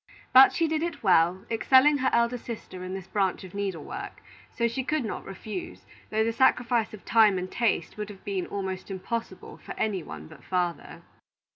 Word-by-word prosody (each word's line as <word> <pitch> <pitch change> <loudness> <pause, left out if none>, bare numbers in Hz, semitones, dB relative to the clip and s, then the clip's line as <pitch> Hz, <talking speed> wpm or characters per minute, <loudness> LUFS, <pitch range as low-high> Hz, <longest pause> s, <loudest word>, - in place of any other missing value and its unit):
But 260 +1 +9
she 330 - +1
did 310 0 -1
it 335 -6 -4
well, 180 -1 +3
excelling 265 +5 +5
her 260 0 +2
elder 235 +1 +2
sister 215 -6 -8
in 185 +1 -5
this 190 -2 -7
branch 195 -1 -1
of 185 0 -11
needle 195 -6 -3
work; - - -8 0.3
so 235 - 0
she 235 +3 -3
could 300 -1 -1
not 215 - -4
refuse, 195 0 -7 0.2
though 220 0 +1
the 230 +1 0
sacrifice 240 -2 +2
of 205 - -17
time 220 -4 +5
and 185 +1 -4
taste 220 -8 0
would 210 0 -4
have 200 -2 -12
been 195 -3 -2
almost 190 -1 -4
impossible 225 +5 -5
for - - -8
any 205 -4 0
one 75 - -9
but - - -15
father. 175 -4 -3
210 Hz, 190 wpm, -27 LUFS, 185-235 Hz, 0.3 s, But